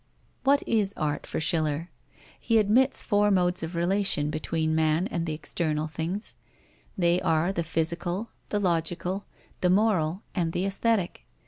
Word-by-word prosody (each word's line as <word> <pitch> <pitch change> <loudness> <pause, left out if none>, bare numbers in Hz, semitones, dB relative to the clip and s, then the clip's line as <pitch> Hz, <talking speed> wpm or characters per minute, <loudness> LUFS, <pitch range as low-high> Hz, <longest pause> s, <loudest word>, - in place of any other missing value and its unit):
What 280 +1 +3
is 205 -3 +1
art 150 -2 -2
for - - -3
Schiller? 155 +1 0 0.5
He 230 - +2
admits 220 +6 +3
four 205 -1 +3
modes 180 -2 +2
of 165 +2 -5
relation 175 -4 +1
between 155 +1 -1
man 160 +3 +2
and 170 -1 -2
external 155 0 -1
things. 165 +7 -4 0.6
They 175 -1 +3
are 165 +4 +1
the 170 - -1
physical, 170 +6 -2 0.2
the 210 - 0
logical, 180 +1 -1 0.3
the 180 - +2
moral, 190 -3 +2
and 170 -4 -1
the 185 - 0
aesthetic. 195 - -1
175 Hz, 140 wpm, -27 LUFS, 160-200 Hz, 0.6 s, What